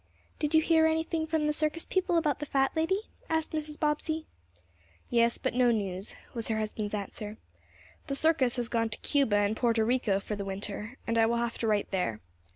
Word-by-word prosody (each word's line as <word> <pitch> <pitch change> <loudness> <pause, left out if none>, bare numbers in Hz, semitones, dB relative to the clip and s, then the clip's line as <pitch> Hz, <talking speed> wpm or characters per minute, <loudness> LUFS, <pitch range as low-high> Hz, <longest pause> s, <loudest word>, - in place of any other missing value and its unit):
"Did 300 +1 +1
you 315 - +6
hear 320 -1 +5
anything 320 0 0
from 320 -1 +1
the 300 - +2
circus 310 +2 0
people 370 -2 +1
about 300 -4 +1
the 295 - -4
fat 270 -1 +2
lady?" 340 +5 +1 0.3
asked 320 -1 0
Mrs. 305 -1 -3
Bobbsey. 310 +1 0 0.9
"Yes, 235 -1 +3
but - - -2
no 250 0 +4
news," 200 -3 -1 0.2
was 230 -3 -3
her 220 - 0
husband's 215 -1 -2
answer. 210 +1 -5 0.7
"The 275 - -1
circus 280 -5 +3
has 245 -2 -1
gone 230 -1 0
to 210 - -4
Cuba 275 -8 +2
and 205 +1 +2
Porto 230 -1 +2
Rico 225 -4 +1
for 210 +1 -4
the 200 - -4
winter, 205 +5 -5
and 230 0 +1
I 225 - +5
will 235 +1 +1
have 235 0 -2
to 230 - 0
write 210 -2 +1
there. 150 - -1
245 Hz, 200 wpm, -29 LUFS, 215-310 Hz, 0.9 s, you